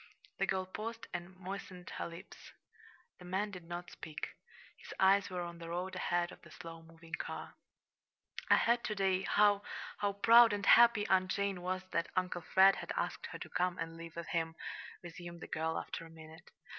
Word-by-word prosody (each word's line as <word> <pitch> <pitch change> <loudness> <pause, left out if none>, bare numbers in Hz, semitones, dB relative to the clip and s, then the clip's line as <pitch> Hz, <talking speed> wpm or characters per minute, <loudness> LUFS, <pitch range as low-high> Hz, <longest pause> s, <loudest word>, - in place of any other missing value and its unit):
The - - +2
girl 190 -1 0
paused 225 +4 -6
and 175 +2 -6
moistened 185 -1 -7
her - - -2
lips. 170 +3 -11 0.7
The 180 - -11
man 195 +3 -1
did 180 -3 -9
not 175 +1 -6
speak. 155 -2 -6 0.5
His - - -10
eyes 195 +1 +5
were 180 -1 -3
on 170 0 -7
the 165 0 -7
road 180 +2 -3
ahead 175 -1 0
of - - -13
the - - -15
slow 165 -2 -9
moving 165 0 -16
car. - - -4 1.0
"I - - +8
heard 235 +1 +3
to 215 - -1
day 190 -2 +2
how 205 +1 +4 0.4
how 200 -1 +1
proud 230 +2 +7
and 200 -1 -2
happy 230 -2 +7
Aunt 185 -1 +3
Jane 200 -2 -1
was 185 +1 -2
that 170 - 0
Uncle 180 -1 0
Fred 190 +3 +6
had - - -5
asked - - -2
her - - -7
to - - -8
come 180 0 0
and 165 0 -4
live 165 -1 -9
with 170 -1 -6
him," 165 -1 -1 0.5
resumed 175 0 -8
the - - -8
girl, 160 +1 -1
after - - -5
a 165 - -11
minute. 160 +1 -13
180 Hz, 195 wpm, -34 LUFS, 170-195 Hz, 1.0 s, I